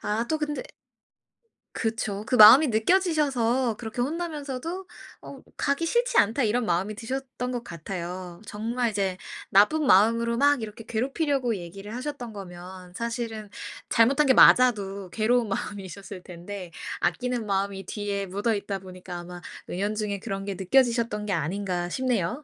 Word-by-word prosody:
아 220 +3 -1
또 315 - 0
근데 295 -1 -3 1.1
그쵸. 220 -3 -2
그 255 - +1
마음이 245 +7 +10
느껴지셔서 260 - +2
그렇게 235 +1 -4
혼나면서도 320 +3 -4 0.3
어 275 - -10 0.2
'가기 280 +4 0
싫지 480 +6 +1
않다.' 230 +6 +3
이런 230 +2 +1
마음이 190 +3 0
드셨던 250 +1 -4
것 240 - -3
같아요. 175 0 -6
정말 235 +4 -2
이제 195 -3 -1 0.3
나쁜 210 +11 +4
마음으로 230 +4 +4
막 285 0 +4
이렇게 220 +1 -7
괴롭히려고 260 +1 0
얘기를 195 +5 -8
하셨던 255 -3 -5
거면 180 -1 -10
사실은 230 -1 -4 0.4
잘못한 255 +6 +4
게 260 - +6
맞아도 200 -7 +5
괴로운 230 +2 +2
마음이셨을 195 -1 -6
텐데 180 +1 -8 0.3
아끼는 250 -3 -1
마음이 195 -1 -2
뒤에 200 0 -3
묻어있다 200 +1 -2
보니까 185 -1 -9
아마 175 0 -9 0.3
은연중에 205 +2 -2
그런 195 -2 -4
게 200 - -3
느껴지셨던 230 +1 +2
게 205 - -3
아닌가 175 +2 -2
싶네요. 250 - -1
220 Hz, 335 characters per minute, -26 LUFS, 195-255 Hz, 1.1 s, 마음이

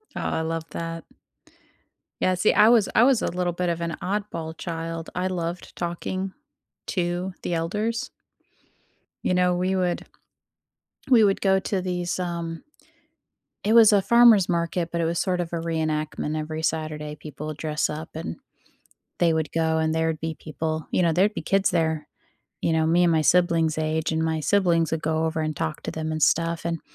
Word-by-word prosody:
Oh, - - -3
I - - -1
love 165 0 -2
that. 165 0 -5 1.2
Yeah, 185 0 +3
see, 180 +4 +3
I 215 - +6
was 230 -4 +5
I - - +5
was 250 -1 +4
a - - 0
little 180 0 -1
bit 180 +1 -2
of 170 0 -2
an 170 0 -3
oddball 185 -5 -3
child; 165 -1 -5
I 180 - -1
loved 175 -1 -4
talking 185 +2 -3 0.5
to 180 0 -2
the 175 - -2
elders. 215 +9 -2 1.1
You - - +1
know, 180 0 +3
we 185 +2 0
would 180 -2 -1 1.0
we 235 -4 +6
would 195 -1 +2
go 190 -1 +3
to 190 0 -2
these, 180 -1 -2
um 170 -2 -4 1.0
it 215 +2 +2
was 225 -2 +8
a 200 - +5
farmer's 235 -4 +6
market, 170 0 -1
but 170 - -1
it - - +1
was 165 +1 -1
sort 180 -1 0
of 175 -1 -3
a - - 0
reenactment. 155 -2 -2
Every 155 +1 -4
Saturday, 155 -2 -2
people 150 0 -8
would 155 - -5
dress 150 -1 -1
up 155 +1 -6
and 165 +9 -5 0.8
they 170 -2 +3
would 160 -2 -1
go, 160 -1 +1
and 160 0 +1
there'd 160 -1 0
be 160 -1 -4
people 155 0 -4
you - - +2
know, 170 -2 +3
there'd 200 +5 +2
be - - -4
kids 195 0 +2
there, 160 -3 0 0.5
you 165 - +1
know, 160 0 +2
me 175 +2 +4
and 170 - +4
my 160 - +3
siblings' 165 -1 +3
age, 155 0 -1
and 160 0 0
my 160 -1 0
siblings 170 0 +2
would 160 0 -2
go 160 +1 0
over 160 0 -2
and 155 0 -2
talk 160 0 -3
to - - -4
them 160 0 -3
and 155 -1 -3
stuff 165 +2 +2
and 170 -1 -2
165 Hz, 190 wpm, -25 LUFS, 160-180 Hz, 1.2 s, was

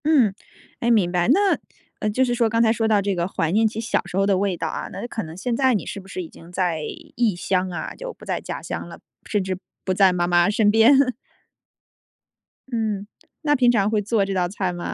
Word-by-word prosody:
嗯， 270 -10 +4 0.5
哎， 235 - 0
明 205 -7 +3
白。 175 -1 +1
那， 390 +9 +4 0.4
呃， 215 - 0
就 255 +5 +2
是 245 - 0
说 235 -2 +2
刚 230 +1 +2
才 220 -1 +4
说 225 -1 0
到 210 -2 +3
这 200 0 0
个 175 -1 -1
怀 165 -4 -1
念 220 +4 +4
起 215 0 -4
小 230 +1 0
时 180 - -5
候 195 - +3
的 195 -1 +2
味 190 -2 0
道 - - -2
啊， - - -4
那 - - -6
有 - - -4
可 230 - -4
能 160 0 -9
现 235 +5 -1
在 260 0 +3
你 205 - -2
是 - - -5
不 190 - -14
是 185 -1 -5
已 165 - -10
经 165 +1 -15
在 175 -3 -1 0.3
异 230 -5 +2
乡 185 +1 0
啊， 175 - -5
就 - - -6
不 - - -15
在 - - -2
家 - - -6
乡 - - -5
了， - - -11 0.3
甚 205 -3 +1
至 185 -1 -3 0.3
不 185 - +1
在 190 0 +5
妈 175 -1 0
妈 175 +1 +3
身 210 0 +3
边。 255 +4 +5 1.6
嗯， 215 -5 -2 0.3
那 295 -2 +2
平 250 -3 +4
常 205 -4 +2
会 215 -1 +1
做 210 0 +1
这 195 - -3
道 180 -2 +1
菜 185 0 -2
吗？ 175 0 -5
205 Hz, 260 characters per minute, -23 LUFS, 185-230 Hz, 1.6 s, 在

